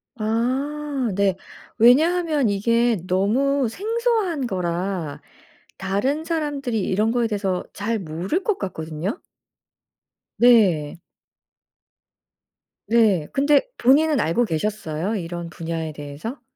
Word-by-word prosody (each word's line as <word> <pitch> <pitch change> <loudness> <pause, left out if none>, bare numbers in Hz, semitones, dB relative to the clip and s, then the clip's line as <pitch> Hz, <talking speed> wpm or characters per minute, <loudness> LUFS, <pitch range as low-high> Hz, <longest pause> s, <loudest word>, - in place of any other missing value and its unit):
아. 260 +4 -1
네. 200 -2 +2 0.4
왜냐하면 305 +4 +4
이게 230 +3 +2
너무 245 +9 +1
생소한 425 - -1
거라 180 -4 -3 0.6
다른 230 +11 -1
사람들이 290 -8 -2
이런 210 +3 +1
거에 240 -1 +1
대해서 195 -4 -2
잘 220 +2 -2
모를 180 - -3
것 425 - 0
같거든요. 165 - -4 1.2
네. 185 -10 +4 1.9
네. 215 -9 +3
근데 285 +1 +4 0.2
본인은 295 +4 +4
알고 200 +10 +1
계셨어요? 185 +1 -2
이런 170 -2 -5
분야에 165 -2 -5
대해서? 150 - -7
225 Hz, 205 characters per minute, -22 LUFS, 180-275 Hz, 1.9 s, 왜냐하면